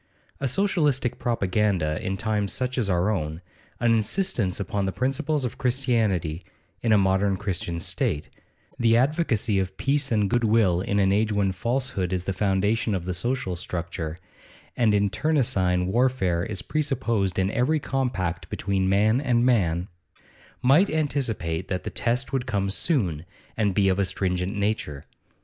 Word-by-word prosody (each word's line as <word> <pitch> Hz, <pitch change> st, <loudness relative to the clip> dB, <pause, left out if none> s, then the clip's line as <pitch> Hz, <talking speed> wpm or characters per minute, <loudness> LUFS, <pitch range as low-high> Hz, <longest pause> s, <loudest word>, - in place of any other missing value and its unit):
A 140 Hz, -, 0 dB
Socialistic 145 Hz, -, +1 dB
propaganda 95 Hz, -8 st, 0 dB
in 95 Hz, +1 st, -2 dB
times 105 Hz, -2 st, -1 dB
such 125 Hz, 0 st, -2 dB
as 105 Hz, -5 st, 0 dB
our 90 Hz, +3 st, +2 dB
own, 80 Hz, -5 st, -3 dB, 0.4 s
an 120 Hz, 0 st, +3 dB
insistence 115 Hz, -, 0 dB
upon 100 Hz, 0 st, -2 dB
the -, -, 0 dB
principles 135 Hz, -, -1 dB
of 120 Hz, -, -5 dB
Christianity 110 Hz, -, 0 dB, 0.4 s
in 115 Hz, -, +1 dB
a 110 Hz, -, +6 dB
modern 95 Hz, 0 st, +2 dB
Christian 95 Hz, -3 st, -3 dB
state, 90 Hz, -, -1 dB, 0.5 s
the 115 Hz, -1 st, +4 dB
advocacy 125 Hz, -, +1 dB
of 95 Hz, 0 st, -3 dB
peace 140 Hz, 0 st, +1 dB
and 105 Hz, -3 st, +2 dB
good 120 Hz, +3 st, +1 dB
will 105 Hz, -6 st, +3 dB
in 100 Hz, +1 st, -1 dB
an 95 Hz, -1 st, +3 dB
age 105 Hz, +2 st, +2 dB
when 100 Hz, -2 st, +1 dB
falsehood 115 Hz, -2 st, -2 dB
is 90 Hz, -1 st, -1 dB
the 95 Hz, -, -2 dB
foundation 100 Hz, +3 st, +1 dB
of 90 Hz, -2 st, -4 dB
the 90 Hz, -, -2 dB
social 120 Hz, 0 st, -2 dB
structure, 85 Hz, -2 st, -4 dB, 0.6 s
and 110 Hz, -4 st, +3 dB
internecine 100 Hz, -, +1 dB
warfare 95 Hz, -5 st, +1 dB
is 100 Hz, 0 st, -5 dB
presupposed 115 Hz, -, -1 dB
in 95 Hz, +1 st, +1 dB
every 140 Hz, +8 st, +1 dB
compact 95 Hz, -, -2 dB
between 95 Hz, -1 st, -1 dB
man 110 Hz, +6 st, +3 dB
and 120 Hz, -4 st, +2 dB
man, 90 Hz, -8 st, +2 dB, 0.8 s
might 150 Hz, +10 st, +5 dB
anticipate 115 Hz, -, -1 dB
that 90 Hz, -1 st, -3 dB
the -, -, -5 dB
test 125 Hz, +4 st, -1 dB
would 130 Hz, -1 st, -1 dB
come 100 Hz, -4 st, 0 dB
soon, 95 Hz, -, 0 dB, 0.3 s
and 100 Hz, -4 st, 0 dB
be 100 Hz, -1 st, +3 dB
of 95 Hz, 0 st, +2 dB
a 100 Hz, -, +3 dB
stringent 90 Hz, +1 st, -2 dB
nature. 100 Hz, -9 st, -2 dB
105 Hz, 155 wpm, -25 LUFS, 95-125 Hz, 0.8 s, a